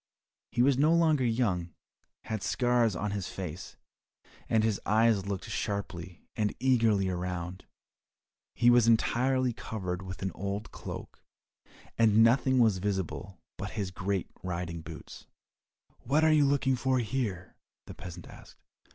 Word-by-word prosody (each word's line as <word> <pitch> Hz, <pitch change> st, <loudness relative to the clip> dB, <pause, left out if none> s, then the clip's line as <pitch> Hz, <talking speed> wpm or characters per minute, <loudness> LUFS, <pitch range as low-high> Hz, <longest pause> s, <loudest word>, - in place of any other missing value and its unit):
He 120 Hz, -, +2 dB
was 135 Hz, 0 st, +3 dB
no 155 Hz, +3 st, +5 dB
longer 160 Hz, -5 st, +3 dB
young, 105 Hz, -9 st, 0 dB, 0.5 s
had 110 Hz, -3 st, -4 dB
scars 120 Hz, -5 st, +2 dB
on 105 Hz, +3 st, -2 dB
his 100 Hz, -2 st, -3 dB
face, 90 Hz, -1 st, -7 dB, 0.7 s
and 110 Hz, -1 st, +3 dB
his 110 Hz, -2 st, 0 dB
eyes 110 Hz, -2 st, +3 dB
looked 100 Hz, +1 st, -4 dB
sharply 95 Hz, -5 st, -4 dB
and 105 Hz, -2 st, -1 dB
eagerly 115 Hz, -7 st, +3 dB
around. 90 Hz, 0 st, -4 dB, 0.9 s
He 120 Hz, 0 st, +5 dB
was 120 Hz, -2 st, +5 dB
entirely 125 Hz, +2 st, +2 dB
covered 95 Hz, -5 st, -4 dB
with 95 Hz, 0 st, -7 dB
an 95 Hz, -, -1 dB
old 100 Hz, +3 st, -4 dB
cloak, -, -, -8 dB, 0.8 s
and 110 Hz, -1 st, +6 dB
nothing 130 Hz, +3 st, +4 dB
was 110 Hz, -6 st, +4 dB
visible 95 Hz, -1 st, -3 dB, 0.2 s
but 100 Hz, -, -5 dB
his 100 Hz, -3 st, -2 dB
great 95 Hz, +1 st, -2 dB
riding 85 Hz, -2 st, -4 dB
boots. 80 Hz, 0 st, -10 dB, 0.7 s
"What 150 Hz, +5 st, +1 dB
are 155 Hz, 0 st, +5 dB
you 150 Hz, -2 st, +5 dB
looking 140 Hz, -1 st, +2 dB
for 130 Hz, +1 st, +1 dB
here?" 110 Hz, -6 st, -3 dB, 0.3 s
the -, -, -9 dB
peasant 90 Hz, -1 st, -9 dB
asked. -, -, -14 dB
105 Hz, 140 wpm, -30 LUFS, 95-120 Hz, 0.9 s, and